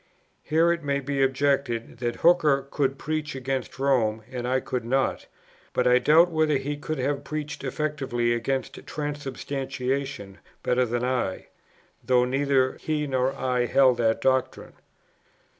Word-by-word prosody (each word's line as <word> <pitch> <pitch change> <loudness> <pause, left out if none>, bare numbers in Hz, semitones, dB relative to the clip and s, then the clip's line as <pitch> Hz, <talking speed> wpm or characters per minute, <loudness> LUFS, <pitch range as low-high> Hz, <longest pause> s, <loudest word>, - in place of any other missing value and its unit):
Here 165 +3 +3
it 170 -1 -2
may 140 -1 0
be 140 0 -2
objected, 135 -3 0
that 120 -2 -2
Hooker 155 -6 +4
could 135 -2 0
preach 155 -1 -3
against 130 0 -3
Rome 120 -5 +1
and 125 -1 -4
I 130 +1 +2
could 125 -2 -3
not; 130 +3 0 0.5
but 125 - +1
I 125 0 +5
doubt 160 +7 +5
whether 155 -2 +2
he 140 +2 -3
could 155 +2 -4
have 140 +2 -1
preached 150 -1 -5
effectively 135 -4 -1
against 130 +3 -3
Transubstantiation 135 -6 -4 0.2
better 125 0 +2
than 120 +1 -2
I, 125 -7 -2 0.5
though 125 -1 +3
neither 135 0 +1
he 155 -1 -1
nor 130 -1 0
I 125 -2 0
held 130 -2 +4
that 115 -1 +1
doctrine. 130 -1 0
135 Hz, 140 wpm, -26 LUFS, 125-145 Hz, 0.5 s, I